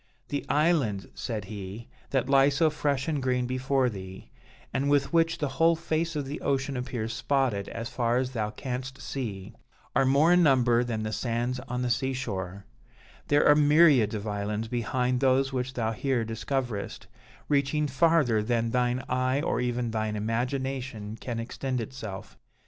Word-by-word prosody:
"'The 145 Hz, -, -2 dB
islands,' 145 Hz, -, +2 dB
said 110 Hz, -5 st, -4 dB
he, 100 Hz, +2 st, -7 dB, 0.2 s
'that 130 Hz, -2 st, 0 dB
lie 135 Hz, 0 st, +5 dB
so 155 Hz, +3 st, +2 dB
fresh 145 Hz, -2 st, -1 dB
and 150 Hz, -4 st, -1 dB
green 125 Hz, -1 st, +1 dB
before 130 Hz, +1 st, +1 dB
thee, 95 Hz, -4 st, -8 dB, 0.4 s
and 140 Hz, +1 st, 0 dB
with 145 Hz, +1 st, +2 dB
which 165 Hz, 0 st, +3 dB
the 150 Hz, -, -1 dB
whole 165 Hz, +1 st, +5 dB
face 165 Hz, 0 st, -2 dB
of 145 Hz, -2 st, -2 dB
the 140 Hz, +3 st, -6 dB
ocean 135 Hz, 0 st, 0 dB
appears 125 Hz, -3 st, -3 dB
spotted 130 Hz, -9 st, 0 dB
as 115 Hz, 0 st, -5 dB
far 120 Hz, 0 st, 0 dB
as 130 Hz, 0 st, -1 dB
thou 110 Hz, -4 st, -2 dB
canst 130 Hz, +3 st, -5 dB
see, 105 Hz, -8 st, -5 dB, 0.4 s
are 135 Hz, -, +4 dB
more 140 Hz, +6 st, +4 dB
in 180 Hz, -, +5 dB
number 125 Hz, -6 st, +4 dB
than 115 Hz, -3 st, -3 dB
the 110 Hz, 0 st, -3 dB
sands 120 Hz, +2 st, -1 dB
on 125 Hz, +1 st, -2 dB
the 125 Hz, -, 0 dB
sea 130 Hz, +2 st, 0 dB
shore: 100 Hz, -7 st, -4 dB, 0.6 s
there 145 Hz, 0 st, +4 dB
are 150 Hz, -, +8 dB
myriads 145 Hz, -7 st, +5 dB
of 105 Hz, 0 st, -4 dB
islands 105 Hz, +2 st, -2 dB
behind 125 Hz, +2 st, 0 dB
those 135 Hz, 0 st, +2 dB
which 130 Hz, 0 st, -2 dB
thou 115 Hz, -2 st, 0 dB
here 120 Hz, 0 st, 0 dB
discoverest, 115 Hz, -1 st, -3 dB, 0.4 s
reaching 145 Hz, +1 st, +1 dB
farther 145 Hz, -5 st, +3 dB
than 115 Hz, +1 st, 0 dB
thine 125 Hz, +1 st, +1 dB
eye 130 Hz, +1 st, +1 dB
or -, -, 0 dB
even 120 Hz, -1 st, -1 dB
thine 110 Hz, -1 st, -1 dB
imagination 120 Hz, 0 st, -3 dB
can 115 Hz, 0 st, -5 dB
extend 125 Hz, +2 st, -3 dB
itself. 100 Hz, -, -7 dB
125 Hz, 165 wpm, -28 LUFS, 115-140 Hz, 0.6 s, are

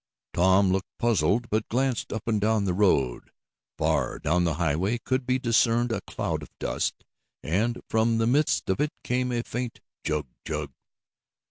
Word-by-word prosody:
Tom 95 Hz, +2 st, +4 dB
looked 95 Hz, +1 st, -1 dB
puzzled, 115 Hz, 0 st, +2 dB
but 110 Hz, 0 st, 0 dB
glanced 130 Hz, 0 st, 0 dB
up 110 Hz, +1 st, -5 dB
and 110 Hz, -3 st, +1 dB
down 110 Hz, -1 st, +2 dB
the 90 Hz, -, +1 dB
road. 80 Hz, -11 st, +2 dB, 0.5 s
Far -, -, +1 dB
down 90 Hz, +4 st, +1 dB
the 80 Hz, -3 st, 0 dB
highway 85 Hz, +7 st, 0 dB
could 130 Hz, +2 st, -2 dB
be 130 Hz, 0 st, +3 dB
discerned 120 Hz, -1 st, +2 dB
a -, -, -1 dB
cloud -, -, -3 dB
of -, -, -10 dB
dust, -, -, -2 dB, 0.4 s
and, 110 Hz, +9 st, 0 dB
from 115 Hz, +1 st, +2 dB
the 115 Hz, -, +2 dB
midst 140 Hz, +6 st, +2 dB
of 95 Hz, +5 st, 0 dB
it 150 Hz, 0 st, 0 dB
came 125 Hz, 0 st, 0 dB
a 120 Hz, -1 st, -1 dB
faint 120 Hz, 0 st, -4 dB, 0.2 s
"chug 75 Hz, -1 st, -1 dB, 0.2 s
chug." 75 Hz, -3 st, -4 dB
110 Hz, 165 wpm, -26 LUFS, 90-120 Hz, 0.5 s, Tom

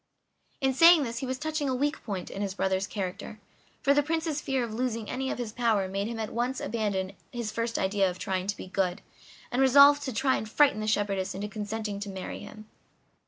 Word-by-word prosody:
In 265 Hz, -1 st, +2 dB
saying 330 Hz, +3 st, +7 dB
this 235 Hz, -2 st, -4 dB
he 265 Hz, -, -4 dB
was 260 Hz, 0 st, -2 dB
touching 310 Hz, -1 st, -2 dB
a 260 Hz, -, 0 dB
weak 290 Hz, +4 st, -1 dB
point 195 Hz, -5 st, -5 dB
in 195 Hz, -, -5 dB
his 195 Hz, -2 st, -2 dB
brother's 190 Hz, 0 st, 0 dB
character; 200 Hz, +1 st, -5 dB, 0.4 s
for 280 Hz, -, +5 dB
the 290 Hz, -, +4 dB
Prince's 315 Hz, 0 st, -1 dB
fear 265 Hz, -2 st, 0 dB
of 230 Hz, -2 st, -5 dB
losing 230 Hz, -2 st, -2 dB
any 265 Hz, +1 st, -2 dB
of -, -, -3 dB
his 240 Hz, -3 st, -4 dB
power 220 Hz, -4 st, +1 dB
made 195 Hz, +2 st, -2 dB
him 230 Hz, 0 st, -4 dB
at 220 Hz, -1 st, -4 dB
once 245 Hz, +3 st, -1 dB
abandon 200 Hz, -4 st, -2 dB, 0.2 s
his 235 Hz, -3 st, -4 dB
first 230 Hz, +1 st, -2 dB
idea 195 Hz, 0 st, +2 dB
of 180 Hz, -, -6 dB
trying 190 Hz, -1 st, -2 dB
to 205 Hz, -, -2 dB
be -, -, -7 dB
good, 185 Hz, 0 st, -1 dB, 0.5 s
and 250 Hz, +1 st, +1 dB
resolve 280 Hz, +2 st, +7 dB
to 285 Hz, -2 st, -4 dB
try 265 Hz, +3 st, +2 dB
and 215 Hz, -, -5 dB
frighten 275 Hz, -2 st, +4 dB
the 215 Hz, -, -3 dB
shepherdess 200 Hz, -3 st, 0 dB
into 200 Hz, +2 st, -3 dB
consenting 210 Hz, -1 st, -4 dB
to 205 Hz, 0 st, -5 dB
marry 190 Hz, -1 st, -6 dB
him. 215 Hz, 0 st, -11 dB
220 Hz, 220 wpm, -28 LUFS, 200-265 Hz, 0.5 s, saying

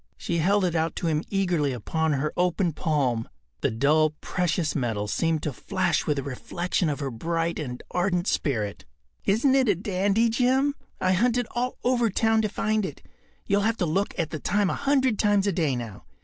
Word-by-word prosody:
She 170 Hz, -, -2 dB
held 195 Hz, +4 st, +3 dB
it 175 Hz, -, 0 dB
out 160 Hz, -1 st, 0 dB
to -, -, -4 dB
him 155 Hz, -2 st, +1 dB
eagerly 175 Hz, -8 st, +1 dB
upon 160 Hz, +7 st, -1 dB
her 145 Hz, +2 st, -1 dB
open 180 Hz, -1 st, +1 dB
palm. 135 Hz, -9 st, 0 dB, 0.3 s
The -, -, +1 dB
dull 150 Hz, +6 st, +2 dB
precious 175 Hz, -3 st, -1 dB
metal 110 Hz, -7 st, -1 dB
seemed 160 Hz, +6 st, 0 dB
to 150 Hz, -, -2 dB
flash 185 Hz, +4 st, -1 dB
with 150 Hz, -2 st, +1 dB
a 140 Hz, -, -2 dB
reflection 170 Hz, +6 st, -2 dB
of 150 Hz, 0 st, -3 dB
her 135 Hz, -1 st, -2 dB
bright 165 Hz, +7 st, -2 dB
and 125 Hz, -4 st, -5 dB
ardent 180 Hz, -1 st, 0 dB
spirit. 110 Hz, -, -1 dB, 0.4 s
“Isn’t 235 Hz, +7 st, +3 dB
it 265 Hz, -4 st, +3 dB
a 200 Hz, -, +4 dB
dandy, 200 Hz, +4 st, +1 dB
Jim? 260 Hz, +4 st, +2 dB, 0.3 s
I 185 Hz, -, +2 dB
hunted 240 Hz, +6 st, +2 dB
all 250 Hz, +1 st, -2 dB
over 240 Hz, -2 st, +2 dB
town 220 Hz, +2 st, +2 dB
to 215 Hz, -, 0 dB
find 215 Hz, +1 st, 0 dB
it. 160 Hz, -7 st, -6 dB, 0.4 s
You’ll 200 Hz, +1 st, +2 dB
have 225 Hz, +2 st, +1 dB
to 180 Hz, -, 0 dB
look 190 Hz, +6 st, -1 dB
at 165 Hz, -4 st, -1 dB
the 155 Hz, -, -4 dB
time 205 Hz, +4 st, +1 dB
a -, -, -1 dB
hundred 265 Hz, -5 st, +1 dB
times 205 Hz, -2 st, +3 dB
a 200 Hz, -, +2 dB
day 160 Hz, -7 st, 0 dB
now. 115 Hz, -5 st, -7 dB
175 Hz, 195 wpm, -26 LUFS, 150-205 Hz, 0.4 s, a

